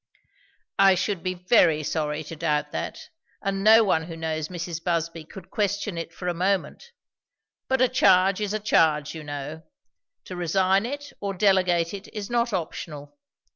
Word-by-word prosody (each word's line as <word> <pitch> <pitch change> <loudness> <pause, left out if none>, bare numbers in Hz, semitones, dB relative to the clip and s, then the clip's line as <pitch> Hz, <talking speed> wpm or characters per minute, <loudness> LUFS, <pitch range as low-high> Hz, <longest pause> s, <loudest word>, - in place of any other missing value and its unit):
"I 195 -1 +6
should 190 0 -2
be 185 +1 -2
very 175 -4 +3
sorry 150 0 -2
to 160 +2 -8
doubt 150 -2 -1
that, - - -5 0.3
and 195 -1 -2
no 220 +2 +7
one 160 -6 +1
who 165 -1 -8
knows 160 -1 -3
Mrs. 170 -1 -6
Busby 165 -2 -2
could 185 +3 -12
question 205 -1 -1
it 165 0 -5
for 180 +2 -7
a 175 - +1
moment. 190 - -1 0.8
But 265 -1 +1
a - - +5
charge 190 -4 +4
is 210 0 -1
a - - -1
charge, 155 -8 +2
you 160 -2 -8
know. 145 +2 -6 0.6
To 185 - -7
resign 190 +4 +1
it 285 +2 -7
or 200 -1 -3
delegate 180 -3 +2
it 200 +1 -7
is 210 +1 -5
not 235 0 +1
optional. 155 - -5
180 Hz, 170 wpm, -25 LUFS, 160-200 Hz, 0.8 s, no